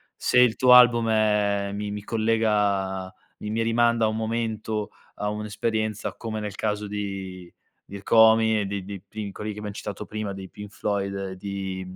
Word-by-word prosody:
se 125 - +2
il 125 -3 +5
tuo 125 -1 +5
album 120 -2 +7
è 105 -2 +2
mi 105 0 -4
mi 105 0 -5
collega 105 -4 0 0.3
mi 105 - -5
mi 115 +1 0
rimanda 115 0 +2
a - - +3
un 110 - -3
momento, 110 -1 -2 0.3
a 105 - -2
un'esperienza 105 0 -2
come 110 -2 -5
nel 105 -2 -5
caso 105 -1 -2
di, 95 -3 -6 0.3
di 100 - -8
Rkomi 110 +1 +5
e - - -2
di 100 0 -4
di 100 -2 -7
pri 105 0 -6
quelli 105 +2 -5
che 105 - -9
abbiam 105 -1 -6
citato 105 +1 -6
prima, 105 -2 -4
dei 95 -1 -8
Pink 105 -1 -10
Floyd 100 -1 -2
e 95 -1 -5
di, 95 -1 -5
105 Hz, 180 wpm, -25 LUFS, 100-110 Hz, 0.3 s, album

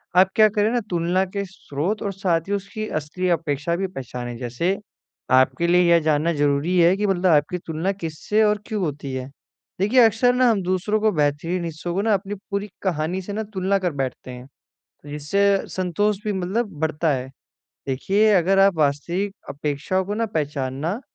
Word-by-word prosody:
आप 185 +1 +6
क्या 215 -1 +7
करें 210 0 +1
ना 245 - +1
तुलना 175 +2 +1
के 200 +2 -4
स्रोत 185 +1 -4
और 200 - -2
साथ 185 -4 0
ही 200 - -1
उसकी 200 +2 -4
असली 155 +5 -2
अपेक्षा 165 -1 0
भी 190 +2 -1
पहचानें। 125 -6 -6
जैसे, 130 +11 -1 0.5
आपके 130 +5 +3
लिए 175 +1 +5
यह 170 - +6
जानना 155 +3 +2
ज़रूरी 145 +4 +1
है 175 +2 +5
कि 210 +1 0
मतलब 190 -1 0
आपकी 150 +3 +2
तुलना 165 +4 -1
किससे 195 +3 -1
और 210 0 +3
क्यों 215 -3 -2
होती 145 -4 -4
है? 130 0 -4 0.5
देखिए 210 +7 +3
अक्सर 230 +3 +3
ना 250 -1 +4
हम 205 -4 +2
दूसरों 185 +4 0
को 215 0 +3
बेहतरीन 160 +3 0
हिस्सों 165 +1 -5
को 190 - 0
ना 220 +1 +2
अपनी 200 +1 -2 0.2
पूरी 200 +1 -2
कहानी 175 0 -1
से 200 +2 -7
ना 220 +2 -2
तुलना 190 +1 +1
कर 180 -2 -1
बैठते 130 -1 -5
हैं 125 +1 -10 0.6
जिससे 150 +7 0 0.3
संतोष 190 +3 0
भी 210 - 0
मतलब 195 +5 -1
बढ़ता 160 0 0
है। 130 -1 -3 0.6
देखिए 195 +11 +2
अगर 190 +1 +3
आप 195 -1 +5
वास्तविक 170 +7 0
अपेक्षाओं 150 +6 -2
को 205 +2 -3
ना 230 +1 0
पहचानना 145 - -2
180 Hz, 180 wpm, -22 LUFS, 150-200 Hz, 0.6 s, क्या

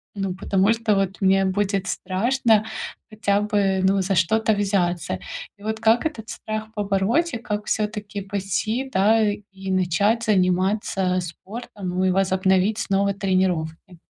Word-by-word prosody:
ну, 195 -2 -2
потому 195 +2 +2
что 225 -2 +1
вот 195 -1 -1
мне 195 0 +4
будет 195 0 0
страшно 225 +2 +1 0.5
хотя 205 -2 0
бы, 200 -2 +1
ну, 195 +1 +3
за 195 - 0
что-то 220 +6 +2
взяться. 185 -5 0 0.4
И 200 - -17
вот 220 +1 -3
как 225 +3 +3
этот 230 -8 -4
страх 215 0 -5
побороть, 210 - +1
и 240 - -1
как 210 -2 -4
всё-таки 210 -1 -2
пойти, 205 +6 -2
да, 215 +4 +4
и 195 -2 -7
начать 195 +5 +1
заниматься 185 -1 +1
спортом, 195 +3 -7
ну, 185 +1 0
и 185 - +3
возобновить 190 +2 +2
снова 200 -1 +1
тренировки? 185 -3 -1
200 Hz, 140 wpm, -23 LUFS, 190-215 Hz, 0.5 s, мне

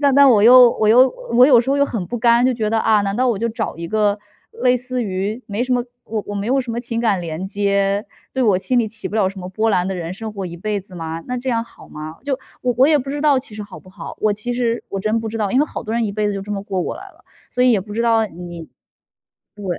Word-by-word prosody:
但 280 -2 +3
但 280 0 +7
我 210 -3 +5
又 245 +2 +9
我 215 - +3
又 250 +4 +6 0.2
我 250 +2 +7
有 255 -5 +6
时 255 +3 -2
候 280 - +2
又 280 - +4
很 220 -9 -3
不 240 +5 -4
甘， 235 +1 +4
就 260 - +3
觉 220 -2 -1
得： 225 - +2
“啊， 215 -2 +3
难 200 0 -2
道 255 +1 +2
我 230 -5 0
就 230 +3 -1
找 225 0 -4
一 170 0 -6
个 210 0 +1 0.4
类 250 0 +4
似 250 +1 -3
于 205 +3 -3
没 210 +4 -2
什 255 - -1
么 245 -1 +1 0.2
我 220 -1 -3
我 205 - -4
没 200 0 -3
有 270 +2 +2
什 245 -2 -5
么 235 - -3
情 235 -1 -3
感 215 -6 +1
连 165 +1 -5
接， 200 0 0 0.3
对 265 - -2
我 205 -6 +3
心 250 +6 0
里 235 - +2
起 220 +1 -4
不 215 - -4
了 200 -4 +3
什 195 0 -9
么 180 - -6
波 215 +4 0
澜 180 -3 +1
的 190 - -3
人 170 0 -5
生 220 +2 -6
活 195 -2 -5
一 170 0 -8
辈 205 +2 -2
子 185 0 -16
吗？ 165 -1 -5
那 250 - -3
这 255 +1 -3
样 230 -1 0
好 - - -17
吗？ 155 +1 -8
“就， 275 -2 -1 0.2
我 250 - +1
我 265 - +6
也 305 0 +4
不 275 -1 -3
知 290 +1 -3
道 290 -3 +4
其 245 -4 -11
实 210 - -5
好 205 - -12
不 185 - -18
好， - - -9
我 215 - +2
其 210 +4 -4
实 240 -1 -1
我 195 - -3
真 215 +3 0
不 225 - -4
知 225 - -5
道。 205 -3 -1
因 255 - +2
为 295 - +3
好 - - -6
多 220 - -5
人 235 0 +1
一 205 - -2
辈 210 0 0
子 - - -1
就 200 - -4
这 205 +2 -6
么 200 -1 -3
过 190 -2 -3
过 - - -3
来 - - -10
了， - - -24 0.3
所 250 0 +2
以 250 - +5
也 205 - +2
不 205 +2 -9
知 225 - -2
道 225 -1 +3
你 175 -3 -9 0.9
对， 205 - -10
220 Hz, 330 characters per minute, -19 LUFS, 200-245 Hz, 0.9 s, 又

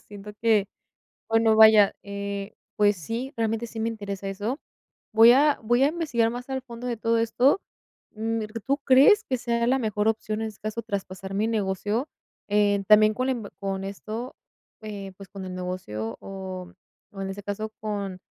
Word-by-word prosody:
siento 205 0 -10
que, 215 -3 +3 0.6
bueno, 225 0 +4
vaya, 220 -2 +8
eh, 200 0 -5 0.2
pues 205 -1 +4
sí, 230 - -5
realmente 225 +1 -1
sí 225 - -9
me 225 +1 0
interesa 200 -3 -5
eso. 210 +8 -3 0.5
Voy 225 +2 +8
a 290 +3 +4
voy 240 +3 +2
a - - +5
investigar 290 -9 0
más 245 +2 -7
al 265 -1 -2
fondo 240 -1 -8
de 240 - -2
todo 230 +1 +1
esto, 250 - +3 0.5
mm, 225 +1 -2 0.3
¿tú 275 +1 +1
crees 285 +12 +6
que 260 - -1
sea 235 -1 0
la 265 - +3
mejor 215 -3 0
opción, 215 -1 -1
en 220 - -2
este 215 - -13
caso, 215 +2 -4
traspasar 195 -2 -5
mi 210 +2 +1
negocio? 210 - -1 0.4
Eh, 205 -1 +2
también 215 0 +6
con 255 +4 -1
la 265 - +2
inv 230 -5 -5
con 195 -1 -3
esto, 215 +5 -6 0.5
eh, 200 -3 -7
pues 195 0 -12
con 195 0 -8
el 185 -1 -6
negocio, 180 -13 -4
o 185 -2 -7 0.4
o 195 - -8
en 195 - -3
este 200 +1 -7
caso 205 +2 -4
con, 200 -3 -4
215 Hz, 180 wpm, -26 LUFS, 200-235 Hz, 0.6 s, vaya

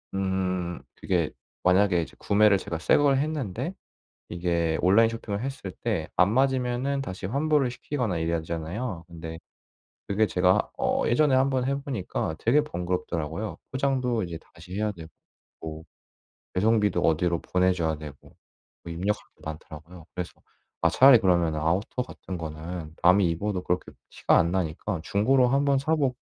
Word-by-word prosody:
음 95 -2 -1 0.2
그게 85 -6 0 0.3
만약에 90 -2 +4
이제 - - -12
구매를 105 -1 +4
제가 85 - -4
새 80 - +3
걸 140 -2 +4
했는데 140 - -2 0.6
이게 85 -2 0
온라인 100 +5 +5
쇼핑을 110 -3 -4
했을 135 -8 -5
때 95 -6 -3
안 90 +4 +4
맞으면은 130 +1 +1
다시 95 -7 -5
환불을 140 +2 +1
시키거나 125 - -2
이래야 85 +1 0
되잖아요. 85 +4 -4
근데 80 -1 -8 0.7
그게 105 +2 +2
제가 90 -2 +2
어 - - +1
예전에 135 +3 +3
한번 130 -1 +2
해보니까 135 - -3
되게 135 +7 +3
번거롭더라고요. 90 - -3
포장도 130 -4 0
이제 85 -2 -6 0.2
다시 90 +2 -11
해야 105 +1 0
되고. 85 -4 -11 0.5
뭐 80 0 -6 0.7
배송비도 105 -2 +2
어디로 85 +1 +1
보내줘야 90 -3 +1
되고 75 -2 -9 0.7
뭐 85 - -6
입력할 100 +5 -1 0.2
게 - - -27
많더라고요. 80 +2 -9
그래서 90 -1 -4 0.5
아 - - +4
차라리 135 -1 +8
그러면 85 -5 +2
아우터 90 +11 0
같은 95 -7 -8
거는 80 0 -6
남이 90 +2 +5
입어도 95 +2 -2
그렇게 90 +1 -2 0.2
티가 - - +3
안 85 - +3
나니까 90 0 -2
중고로 125 +7 +3
한번 140 +1 +2
사보고 140 -3 +1
95 Hz, 340 characters per minute, -26 LUFS, 85-125 Hz, 0.7 s, 차라리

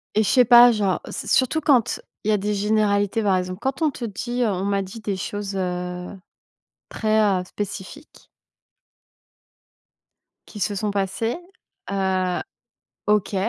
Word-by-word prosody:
et 215 - +4
je - - -1
sais 250 -2 +5
pas, 240 +1 +8
genre, 200 -4 0
c'est - - -6
surtout 265 +5 +2
quand 265 -7 +2 0.2
il 215 - -1
y - - +5
a 210 - +3
des 210 +2 -1
généralités, 210 +1 +1
par 190 -2 +3
exemple, 185 +1 -4
quand 265 +3 -2
on 310 - +3
te 245 -3 -6
dit: 240 +4 -4
«On 190 -4 -1
m'a 200 0 +1
dit 195 +4 -8
des 205 -2 -2
choses, 200 +1 -4
heu, 180 -1 -3 0.8
très, 220 0 +1 0.2
heu, - - -6
spécifiques» 205 - -8 2.2
«qui 210 - -10
se 205 +1 -1
sont 210 +1 -1
passées», 200 - -1 0.5
heu, 190 -2 0 0.7
OK, 210 -1 +1
205 Hz, 150 wpm, -23 LUFS, 190-225 Hz, 2.2 s, pas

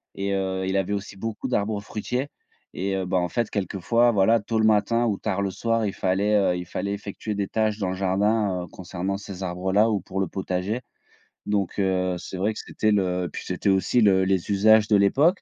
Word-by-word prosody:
et 100 0 -2
heu, 95 -1 -1
il 95 - -1
avait 95 +1 0
aussi 100 0 -5
beaucoup 110 +5 -4
d'arbres 105 -4 0
fruitiers 125 +6 -3 0.5
et 95 +1 -2
heu, 95 - -2
ben, 90 +1 0
en 90 0 0
fait 120 -2 -1
quelquefois, 105 +5 +1
voilà, 110 +2 +4
tôt 110 +1 -1
le 110 - +3
matin 110 +2 +3
ou 105 -4 0
tard 100 -2 -2
le 100 - -1
soir 115 +2 0
il 100 - -2
fallait, 100 +3 +1
heu, 95 -3 +2
il 90 - -5
fallait 100 +3 -3
effectuer 100 +1 -5
des 100 -1 -2
tâches 110 0 0
dans 95 -3 -1
le 95 - -2
jardin, 100 0 +1
heu, - - -14
concernant 95 +2 -4
ces 100 -2 -8
arbres-là 95 +4 +1
ou 105 -3 0
pour 95 - -5
le 95 - +1
potager. 95 +6 -3 0.6
Donc, 105 -2 -1
heu, 95 -2 +1
c'est 95 - -7
vrai 105 +4 0
que - - -8
c'était 110 -1 -1
le 90 -3 0
puis - - -6
c'était - - -1
aussi 95 +5 +2
le 95 -3 +4
les 95 0 0
usages 110 +2 +5
de 105 - +4
l'époque. 140 - +3
100 Hz, 220 wpm, -24 LUFS, 95-110 Hz, 0.6 s, usages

